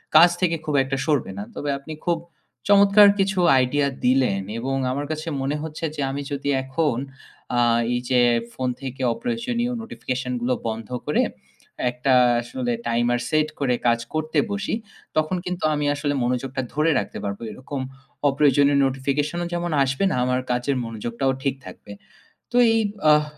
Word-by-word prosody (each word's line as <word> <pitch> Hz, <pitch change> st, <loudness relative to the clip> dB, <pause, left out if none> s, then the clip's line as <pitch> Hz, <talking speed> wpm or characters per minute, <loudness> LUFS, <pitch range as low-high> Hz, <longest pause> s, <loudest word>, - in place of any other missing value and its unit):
কাজ 170 Hz, +3 st, +9 dB
থেকে 170 Hz, -2 st, +2 dB
খুব 150 Hz, -, -1 dB
একটা 135 Hz, 0 st, -2 dB
সরবে 145 Hz, -10 st, +1 dB
না। 100 Hz, -, -4 dB
তবে 145 Hz, -, -3 dB
আপনি 155 Hz, +3 st, -8 dB
খুব 170 Hz, -1 st, +2 dB, 0.5 s
চমৎকার 200 Hz, 0 st, +7 dB
কিছু 195 Hz, -1 st, +1 dB, 0.2 s
আইডিয়া 140 Hz, +3 st, +2 dB, 0.2 s
দিলেন 125 Hz, -7 st, +3 dB, 0.2 s
এবং 135 Hz, +3 st, -2 dB, 0.2 s
আমার 145 Hz, +2 st, -2 dB
কাছে 155 Hz, +1 st, -4 dB
মনে 140 Hz, +2 st, -1 dB
হচ্ছে 160 Hz, +1 st, -5 dB
যে -, -, -3 dB
আমি 140 Hz, +1 st, -3 dB
যদি 140 Hz, 0 st, -2 dB
এখন 135 Hz, -1 st, 0 dB, 0.6 s
আ -, -, +4 dB, 0.3 s
এই 120 Hz, -, +1 dB
যে 125 Hz, -1 st, +4 dB, 0.3 s
ফোন 130 Hz, -1 st, -2 dB
থেকে 130 Hz, 0 st, -6 dB
অপ্রয়োজনীয় 240 Hz, -, -2 dB
notification 130 Hz, -, -4 dB
গুলো 125 Hz, +1 st, +1 dB
বন্ধ 110 Hz, -1 st, -4 dB, 0.2 s
করে -, -, +2 dB, 0.7 s
একটা 125 Hz, +2 st, 0 dB, 0.3 s
আসলে 120 Hz, 0 st, -3 dB, 0.2 s
টাইমার 120 Hz, +1 st, +1 dB
সেট 155 Hz, -1 st, +2 dB
করে 125 Hz, -3 st, +1 dB
কাজ 115 Hz, 0 st, +3 dB
করতে 155 Hz, 0 st, -2 dB
বসি। 205 Hz, +1 st, -1 dB, 0.4 s
তখন 155 Hz, +4 st, +1 dB
কিন্তু 180 Hz, 0 st, -4 dB
আমি 145 Hz, 0 st, -1 dB
আসলে 145 Hz, 0 st, -1 dB
মনোযোগটা 125 Hz, +2 st, -1 dB
ধরে 155 Hz, +2 st, +2 dB
রাখতে -, -, -5 dB
পারব। 100 Hz, 0 st, -3 dB
এরকম 130 Hz, +4 st, -6 dB, 0.5 s
অপ্রয়োজনীয় 140 Hz, 0 st, +4 dB
notification 140 Hz, +4 st, -1 dB
ও -, -, -2 dB
যেমন 175 Hz, -1 st, -2 dB
আসবে 135 Hz, +7 st, -1 dB
না -, -, 0 dB
আমার 125 Hz, 0 st, +1 dB
কাজের 125 Hz, +3 st, 0 dB
মনোযোগটাও 115 Hz, +4 st, -2 dB
ঠিক 135 Hz, -1 st, 0 dB
থাকবে। 100 Hz, -, -11 dB, 0.6 s
তো 245 Hz, -, +1 dB, 0.2 s
এই 225 Hz, -, +3 dB, 0.3 s
আহ 150 Hz, 0 st, +5 dB
140 Hz, 160 wpm, -23 LUFS, 125-155 Hz, 0.7 s, কাজ